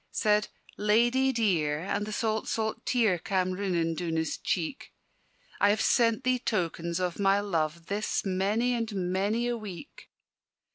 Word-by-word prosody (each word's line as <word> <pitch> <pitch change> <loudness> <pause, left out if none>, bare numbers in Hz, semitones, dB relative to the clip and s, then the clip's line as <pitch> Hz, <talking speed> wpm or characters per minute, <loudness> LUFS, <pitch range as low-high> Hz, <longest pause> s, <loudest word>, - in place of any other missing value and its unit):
Said 210 -2 +2 0.3
"Ladye 240 +5 +3
dear," 170 - +1
and 200 +3 -2
the - - -5
salt, 220 0 -1
salt 220 +1 -2
tear 220 -8 +2
Cam' 185 +1 0
rinnin' 180 -4 -1
doon 165 0 -3
his 160 -1 -1
cheek, 175 - -3 0.7
"I 205 - +5
have 210 - +2
sent 230 +1 +3
thee 255 0 +2
tokens 170 -6 -2
of 180 0 -2
my 195 0 +4
love 165 -4 -2
This 205 +3 -2
many 205 +6 +1
and 230 -2 -2 0.2
many 210 +6 0
a 240 - 0
week. 215 - -9
205 Hz, 150 wpm, -28 LUFS, 180-225 Hz, 0.7 s, I